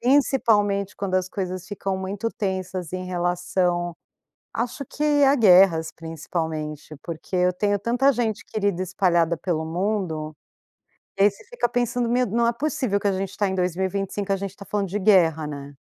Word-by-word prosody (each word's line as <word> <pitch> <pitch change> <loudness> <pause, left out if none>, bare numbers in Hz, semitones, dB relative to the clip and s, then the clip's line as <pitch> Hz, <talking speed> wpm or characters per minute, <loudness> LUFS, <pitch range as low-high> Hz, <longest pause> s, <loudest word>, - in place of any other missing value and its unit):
principalmente 215 -7 +2
quando 195 -2 -3
as 185 -1 +2
coisas 185 -2 -4
ficam 195 -1 -3
muito 195 +4 -3
tensas 185 -3 -3
em 185 0 -3
relação 175 -1 0 0.6
acho 245 +4 -3
que 295 +1 +1
a 275 0 +6
guerras 180 - +6
principalmente, 160 -2 -5
porque 170 +2 -8
eu 180 0 +3
tenho 205 +2 0
tanta 245 +6 +3
gente 230 -4 -1
querida 200 -4 -1
espalhada 175 -3 +1
pelo 160 -2 -2
mundo, 165 -3 -2 0.8
e 195 - +5
aí 205 - +6
você 200 - -17
fica 480 - -1
pensando, 245 0 0
"Meu 250 +1 +2
não 235 +3 +1
é 235 - +3
possível 265 -6 0
que 200 - -3
a - - +2
gente 190 +1 -2
está 205 - -1
em 190 - -2
2025 190 +2 -1
a - - +2
gente 195 0 -4
está 200 +1 -12
falando 200 -1 -2
de 200 +4 -2
guerra 175 -6 +4
né"? 140 -1 -8
190 Hz, 170 wpm, -24 LUFS, 175-215 Hz, 0.8 s, a